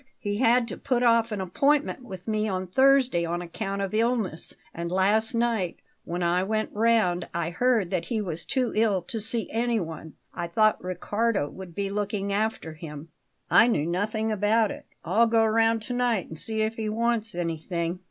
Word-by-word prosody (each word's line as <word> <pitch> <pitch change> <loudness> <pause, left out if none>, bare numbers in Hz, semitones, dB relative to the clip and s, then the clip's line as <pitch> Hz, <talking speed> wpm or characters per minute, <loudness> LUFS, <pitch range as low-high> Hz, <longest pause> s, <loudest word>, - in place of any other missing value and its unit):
He 205 -1 -3
had 240 0 +3
to - - -6
put 250 -1 0
off 230 -1 +4
an 210 - -2
appointment 275 +9 +1
with 190 -6 -9
me 215 0 0
on 185 -2 -2
Thursday 260 -2 +3
on 170 +1 -2
account 195 +3 -4
of 195 - -4
illness; 220 -7 0 0.2
and 170 0 -4
last 210 +5 +2
night, 230 -7 0 0.3
when 175 +1 -3
I 175 +1 +2
went 215 +3 -1
round, 215 -6 +2
I 170 0 -1
heard 225 -1 +1
that 180 -3 -1
he 230 -3 -2
was 175 -6 -4
too 255 -3 -1
ill 210 -5 +2
to 220 +5 -4
see 225 +2 -1
anyone. 200 -10 -2 0.2
I 170 - -4
thought 215 +5 +2
Riccardo 195 0 -1
would 185 -3 -10
be 200 -1 -2
looking 200 -1 -2
after 210 -6 -1
him." 155 0 -9 0.4
"I 230 - +7
knew 155 -11 +1
nothing 215 +6 -1
about 215 +1 +2
it. - - -9 0.2
I'll 220 +7 +3
go 225 0 +3
round 225 0 +2
to 250 - -4
night 245 -6 0
and 160 - -8
see 220 -1 +1
if 220 +1 -2
he 220 -1 -2
wants 230 -1 -1
anything." 170 +1 -3
210 Hz, 185 wpm, -26 LUFS, 180-230 Hz, 0.4 s, I